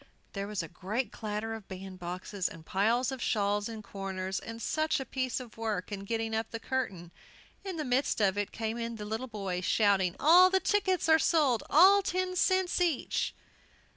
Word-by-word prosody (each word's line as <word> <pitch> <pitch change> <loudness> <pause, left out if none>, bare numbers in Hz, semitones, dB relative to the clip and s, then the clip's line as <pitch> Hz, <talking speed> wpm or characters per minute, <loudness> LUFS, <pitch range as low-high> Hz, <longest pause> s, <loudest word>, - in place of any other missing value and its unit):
There 200 0 -3
was 210 -4 -3
a - - -6
great 200 - -3
clatter 215 0 -4
of 220 -3 -8
bandboxes, 185 0 -5
and 160 -1 -12
piles 230 +9 +1
of 265 -2 -6
shawls 205 0 0
in 220 -2 -7
corners, 190 -1 -4
and 230 0 -8
such 310 +6 0
a 265 - -4
piece 255 0 -2
of 240 -4 -11
work 215 -4 -3
in 200 -1 -5
getting 225 +1 -2
up 225 0 -2
the 230 - -5
curtain! 205 -10 -3 0.5
In 380 -4 -5
the 305 - -2
midst 255 0 +1
of 200 -2 +3
it 205 -1 -2
came 225 +1 -3
in 230 0 -3
the 210 -1 -7
little 220 +4 -3
boys, 195 -5 -4
shouting, 195 -4 +3
"All 355 +5 +7
the 380 0 +3
tickets 375 -2 +1
are 320 0 +6
sold, 285 -10 +3
at 390 +6 +7
ten 370 0 -1
cents 375 0 +2
each!" 335 -7 0
225 Hz, 190 wpm, -30 LUFS, 200-270 Hz, 0.5 s, All